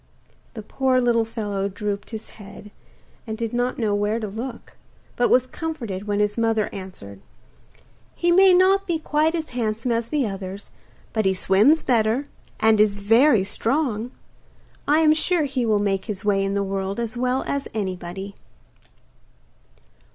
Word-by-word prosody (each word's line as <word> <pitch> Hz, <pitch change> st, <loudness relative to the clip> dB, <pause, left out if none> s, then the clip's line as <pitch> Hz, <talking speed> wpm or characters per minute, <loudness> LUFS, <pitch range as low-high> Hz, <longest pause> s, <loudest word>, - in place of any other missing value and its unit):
The 220 Hz, -, -7 dB
poor 260 Hz, +3 st, +1 dB
little 235 Hz, -2 st, +2 dB
fellow 205 Hz, -3 st, -3 dB
drooped 205 Hz, 0 st, -4 dB
his 220 Hz, -2 st, -8 dB
head, 205 Hz, +1 st, -12 dB, 0.6 s
and 220 Hz, 0 st, -4 dB
did 230 Hz, 0 st, -3 dB
not 245 Hz, +1 st, -1 dB
know 220 Hz, -4 st, 0 dB
where 205 Hz, +2 st, 0 dB
to 215 Hz, -, -4 dB
look, 230 Hz, +4 st, -7 dB, 0.4 s
but 240 Hz, -, +2 dB
was 255 Hz, 0 st, +4 dB
comforted 240 Hz, -, -5 dB
when 205 Hz, 0 st, 0 dB
his 210 Hz, +2 st, 0 dB
mother 225 Hz, -2 st, 0 dB
answered: 100 Hz, -, -9 dB, 0.9 s
'He 345 Hz, 0 st, +1 dB
may 380 Hz, +2 st, +6 dB
not 380 Hz, +2 st, +4 dB
be 340 Hz, -2 st, 0 dB
quite 310 Hz, +1 st, 0 dB
as 320 Hz, -2 st, -4 dB
handsome 230 Hz, 0 st, -2 dB
as 230 Hz, 0 st, 0 dB
the 295 Hz, -4 st, 0 dB
others, 195 Hz, -1 st, -6 dB, 0.4 s
but 220 Hz, -2 st, 0 dB
he 190 Hz, 0 st, +2 dB
swims 210 Hz, +13 st, +3 dB
better, 235 Hz, +2 st, +1 dB, 0.3 s
and 220 Hz, -1 st, +4 dB
is 205 Hz, -1 st, +2 dB
very 225 Hz, +2 st, +4 dB
strong; 230 Hz, +2 st, -1 dB, 0.8 s
I 300 Hz, +2 st, +4 dB
am 310 Hz, -1 st, +5 dB
sure 320 Hz, +1 st, +1 dB
he 265 Hz, -4 st, -1 dB
will 215 Hz, -1 st, +3 dB
make 195 Hz, -2 st, -1 dB
his 200 Hz, -2 st, -5 dB
way 195 Hz, -1 st, +2 dB
in 195 Hz, 0 st, -1 dB
the 200 Hz, -, +1 dB
world 195 Hz, +1 st, -3 dB
as 235 Hz, 0 st, -3 dB
well 255 Hz, +2 st, 0 dB
as 280 Hz, 0 st, -2 dB
anybody. 190 Hz, -1 st, -4 dB
220 Hz, 160 wpm, -23 LUFS, 200-255 Hz, 0.9 s, may